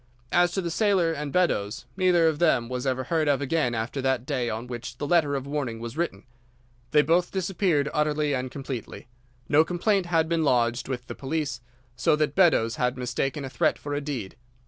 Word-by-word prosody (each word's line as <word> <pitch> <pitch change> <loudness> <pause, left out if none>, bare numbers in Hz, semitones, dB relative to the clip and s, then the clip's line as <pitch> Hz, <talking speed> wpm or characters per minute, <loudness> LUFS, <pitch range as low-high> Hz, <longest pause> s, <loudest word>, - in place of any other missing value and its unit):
As 175 0 +4
to 195 - 0
the 170 - -2
sailor 185 -4 +2
and 150 -2 -4
Beddoes, 115 - 0
neither 180 -3 +4
of 155 -2 0
them 135 -9 +3
was 125 +1 -3
ever 130 0 0
heard 155 +3 0
of 145 -2 +3
again 140 -3 0
after 115 +5 -3
that 130 -2 0
day 130 -4 -1
on 110 +2 -4
which 120 0 -7
the 145 - -3
letter 150 -3 +2
of 135 -1 -3
warning 140 -6 -3
was 115 +2 -6
written. 155 - -2 0.7
They 150 +3 +4
both 175 +4 +2
disappeared 180 -5 0
utterly 150 -1 +1
and 130 -1 -2
completely. 130 -3 -7 0.4
No 150 +2 +5
complaint 180 +2 0
had 165 -2 +2
been 165 -1 +1
lodged 120 -3 +1
with 125 -2 -4
the - - -6
police, 140 -2 -3 0.3
so 120 +4 +3
that 150 -2 0
Beddoes 155 -12 +3
had 125 +1 0
mistaken 135 +3 -2
a - - -4
threat 155 +2 +1
for 145 - -6
a 145 - -1
deed. 130 -10 -5
145 Hz, 200 wpm, -26 LUFS, 125-165 Hz, 0.7 s, No